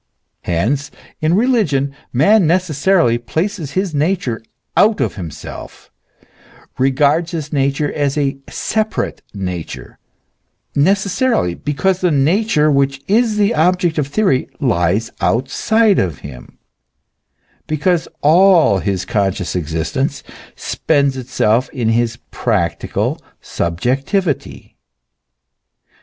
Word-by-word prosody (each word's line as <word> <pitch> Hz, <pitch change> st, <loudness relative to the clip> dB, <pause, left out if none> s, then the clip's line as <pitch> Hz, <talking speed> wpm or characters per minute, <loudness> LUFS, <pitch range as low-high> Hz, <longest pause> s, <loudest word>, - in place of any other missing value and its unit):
Hence, 115 Hz, +12 st, 0 dB, 0.3 s
in 155 Hz, +2 st, +2 dB
religion 190 Hz, -, +1 dB, 0.2 s
man 180 Hz, -, +4 dB
neces 180 Hz, 0 st, +1 dB
sarily 140 Hz, -6 st, +2 dB
places 160 Hz, -, -3 dB
his 190 Hz, -2 st, -1 dB
nature 150 Hz, -5 st, -1 dB, 0.3 s
out 215 Hz, +1 st, +4 dB
of -, -, 0 dB
himself, 85 Hz, -7 st, -9 dB, 0.9 s
regards 145 Hz, +5 st, +2 dB
his 155 Hz, -2 st, -4 dB
nature 140 Hz, +1 st, 0 dB
as 145 Hz, -1 st, -1 dB
a 140 Hz, -2 st, 0 dB
separate 220 Hz, 0 st, -2 dB
nature; 90 Hz, -5 st, -6 dB, 0.7 s
necessarily, 195 Hz, -, +1 dB
because 175 Hz, -, -1 dB
the 180 Hz, -, +3 dB
nature 155 Hz, +2 st, +2 dB
which 140 Hz, -1 st, +1 dB
is 220 Hz, +1 st, +2 dB
the 205 Hz, -1 st, +2 dB
object 175 Hz, +1 st, +2 dB
of 140 Hz, -, 0 dB
theory 145 Hz, -4 st, +1 dB
lies 105 Hz, -, +1 dB
outside 200 Hz, -, +2 dB
of 85 Hz, -7 st, -1 dB
him, 70 Hz, -3 st, -11 dB, 1.1 s
because 160 Hz, +3 st, 0 dB
all 165 Hz, -, +5 dB
his 95 Hz, -2 st, -2 dB
conscious 95 Hz, -3 st, -1 dB
existence 85 Hz, -, -2 dB, 0.3 s
spends 140 Hz, -3 st, 0 dB
itself 125 Hz, -1 st, 0 dB
in 120 Hz, -4 st, -2 dB
his 115 Hz, 0 st, +1 dB
practical -, -, -1 dB, 0.2 s
subjectivity. 135 Hz, -, -2 dB
145 Hz, 100 wpm, -17 LUFS, 120-185 Hz, 1.1 s, all